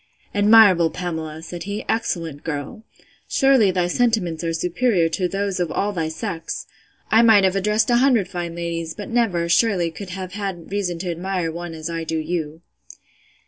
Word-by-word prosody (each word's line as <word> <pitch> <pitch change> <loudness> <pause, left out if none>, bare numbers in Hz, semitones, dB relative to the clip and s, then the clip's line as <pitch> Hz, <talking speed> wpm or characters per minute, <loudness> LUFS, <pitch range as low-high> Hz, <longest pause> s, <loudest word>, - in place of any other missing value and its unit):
Admirable 205 -5 +6
Pamela! 160 -3 -5
said 170 +1 -7
he; 205 +1 -4
excellent 165 -10 -2
girl!—Surely 215 - 0
thy 180 -1 +1
sentiments 180 -5 0
are 165 - -1
superior 180 +2 +1
to 180 +2 -1
those 195 0 -2
of 175 -2 -1
all 205 +1 -1
thy 165 -4 -2
sex!—I 165 +7 -3
might 220 -4 +6
have 190 0 +2
addressed 210 +5 +1
a 240 - +5
hundred 245 -6 +3
fine 175 -2 -5
ladies; 170 -1 -4
but 205 - -7
never, 220 -8 +1
surely, 175 -2 +2
could 185 +4 -8
have 185 0 -6
had 195 -4 -5
reason 195 -4 -1
to 175 +1 -3
admire 175 -1 -2
one 170 0 -6
as 160 0 -6
I 165 -1 -3
do 160 0 -2
you. 160 0 -4
180 Hz, 165 wpm, -22 LUFS, 165-205 Hz, -, Admirable